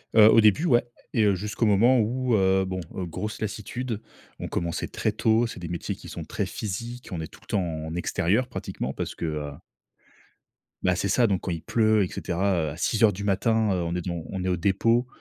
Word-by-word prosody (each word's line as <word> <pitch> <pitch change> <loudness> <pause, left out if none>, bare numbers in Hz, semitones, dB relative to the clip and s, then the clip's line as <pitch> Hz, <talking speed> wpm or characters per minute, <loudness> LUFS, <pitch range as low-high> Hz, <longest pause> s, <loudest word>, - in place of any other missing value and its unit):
Heu, 110 -1 +9
au 115 - +7
début, 110 - +4
ouais 120 -8 +4 0.3
et 110 - +4
heu, 100 -2 +4
jusqu'au 105 +4 -2
moment 115 +5 +5
où 125 +3 0
heu, 95 -1 +3
bon, 95 0 -3
heu, 95 - -3
grosse 95 +6 -5
lassitude, 110 +2 -4 0.4
on - - -4
commençait 85 -1 -2
très 110 - -1
tôt, 110 +2 +2
c'est 115 - -6
des 85 - -6
métiers 85 +1 -3
qui - - -12
sont - - -6
très - - -3
physiques 115 +5 -5
on 85 -3 -3
est 80 - -5
tout - - -17
le - - -22
temps 100 - 0
en 80 -2 -4
extérieur 90 +7 +1
pratiquement, 65 - -4
parce - - -4
que - - -4
heu 75 -2 -3 1.3
Bah 90 0 +2
c'est 100 - -1
ça, 115 +5 +3
donc 95 -4 0
quand 90 - -3
il 80 - -3
pleut 110 0 +3
et - - -1
cetera 85 -3 -1
à 75 - -9
6:00 110 +2 +3
du 100 +2 -6
matin, 105 +2 +2
heu, 90 -2 0
on 85 +1 -2
est 90 - -1
dev 90 0 -3 0.2
on 95 -2 -3
est 95 - 0
au 90 - +1
dépôt, 115 +7 +2
100 Hz, 225 wpm, -26 LUFS, 90-110 Hz, 1.3 s, Heu